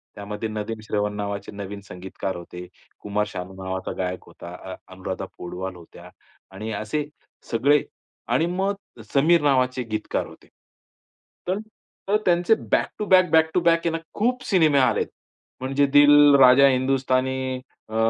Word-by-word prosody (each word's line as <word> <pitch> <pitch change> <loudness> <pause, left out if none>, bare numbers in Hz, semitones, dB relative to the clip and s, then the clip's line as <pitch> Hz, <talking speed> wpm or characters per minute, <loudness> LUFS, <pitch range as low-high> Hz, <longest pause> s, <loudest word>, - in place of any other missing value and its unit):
त्यामध्ये 105 +2 -5
नदीम 110 +1 -4
श्रवण 105 -1 -1
नावाचे 100 -1 -4
नवीन 100 0 -7
संगीतकार 95 +1 -6
होते. 90 +1 -9 0.3
कुमार 105 +1 -1
शानू 95 -2 -7
नावाचा 95 0 -4
गायक 90 0 -3
होता. 85 - -11 0.2
अ - - -5 0.2
अनुराधा 95 +1 -5
पौडवाल 90 +1 -6
होत्या 85 -1 -14 0.4
आणि 105 +4 -6
असे 110 +8 -2 0.5
सगळे 140 +5 +3 0.5
आणि 160 - +3
मग 190 +3 -1 0.4
समीर 160 +4 +4
नावाचे 130 -3 +2
गीतकार 110 0 -2
होते. - - -16 1.0
तर, 185 - 0 0.5
तर 205 +2 +3
त्यांचे 175 +4 +3 0.2
back - - +2
to 210 - -1
back, 185 -2 +5
back 160 0 +5
to - - +3
back 170 0 +4
आहे - - +3
ना 165 - -1 0.2
खूप 250 +4 0
सिनेमे 160 -6 +3
आलेत. 130 - +2 0.5
म्हणजे 135 +2 +1
दिल, 145 0 +7
राजा 135 +1 +7
हिंदुस्तानी 130 0 0 0.3
अ, 110 - -7
130 Hz, 145 wpm, -23 LUFS, 100-150 Hz, 1.0 s, दिल